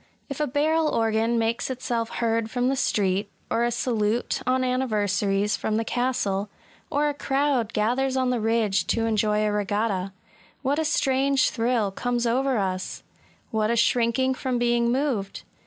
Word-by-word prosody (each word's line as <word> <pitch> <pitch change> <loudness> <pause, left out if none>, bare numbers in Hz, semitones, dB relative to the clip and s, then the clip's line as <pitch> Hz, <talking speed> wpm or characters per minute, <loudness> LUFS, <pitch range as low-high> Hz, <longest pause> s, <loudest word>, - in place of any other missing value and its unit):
If 275 - -5
a 300 - +1
barrel 305 +3 +1
org^n 225 +1 +1
makes 230 +2 0
itself 240 -3 -2
heard 230 -1 -1
from 245 +2 0
the - - +1
street^ 200 -6 0
— - - -38
or 230 - +2
a 240 - +2
salute, 235 -1 -1
on 255 0 +2
anniversaries, 210 -5 0
from 215 - -2
the 225 - -1
castle, 215 -6 -1 0.2
— - - -30
or 295 +1 +1
a 295 - 0
crowd 275 -5 0
gathers 255 +5 0
on 255 -1 +1
the 245 - 0
ridge 220 -2 +1
to 225 -1 +1
enjoy 215 -1 +1
a 210 - +1
regatta, 205 -2 -1 0.3
— - - -30
what 280 +3 +1
a 320 - 0
strange 275 -3 +2
thrill 230 -4 0
comes 240 +4 -1
over 260 +2 +1
us 185 -2 -3
I - - -34 0.3
What 215 -1 +1
a 235 - +2
shrinking 235 +3 +2
from 255 -1 -2
being 235 0 +2
moved 250 -7 -1
235 Hz, 175 wpm, -25 LUFS, 215-260 Hz, 0.3 s, or